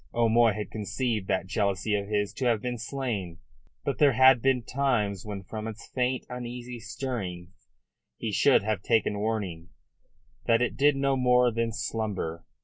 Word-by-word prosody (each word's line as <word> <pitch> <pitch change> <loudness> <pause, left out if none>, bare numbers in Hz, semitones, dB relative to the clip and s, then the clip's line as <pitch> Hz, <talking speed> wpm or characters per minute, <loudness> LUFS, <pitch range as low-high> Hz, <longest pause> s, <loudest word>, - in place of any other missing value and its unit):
O'Moy 115 -1 +4
had 105 0 -5
conceived 110 -1 -2
that 95 - 0
jealousy 100 +1 0
of 100 -1 0
his 105 -1 -1
to 130 - -3
have 115 -3 +3
been 125 +1 -4
slain. 110 -11 -4 0.5
But 140 - -2
there 145 -3 +5
had 130 0 +6
been 130 -1 +2
times 115 -8 -1
when 100 -2 -5
from 110 +3 -6
its 110 0 -8
faint, 125 0 0
uneasy 125 0 -6
stirrings 95 -7 -6 0.5
he 110 - -3
should 130 +2 +4
have 110 -2 -1
taken 110 -2 +1
warning 100 -6 -3 0.8
that 115 0 +4
it 125 - 0
did 145 +1 +4
no 135 0 +1
more 125 -1 +4
than 115 0 -1
slumber. 105 -7 -3
115 Hz, 160 wpm, -27 LUFS, 105-125 Hz, 0.8 s, had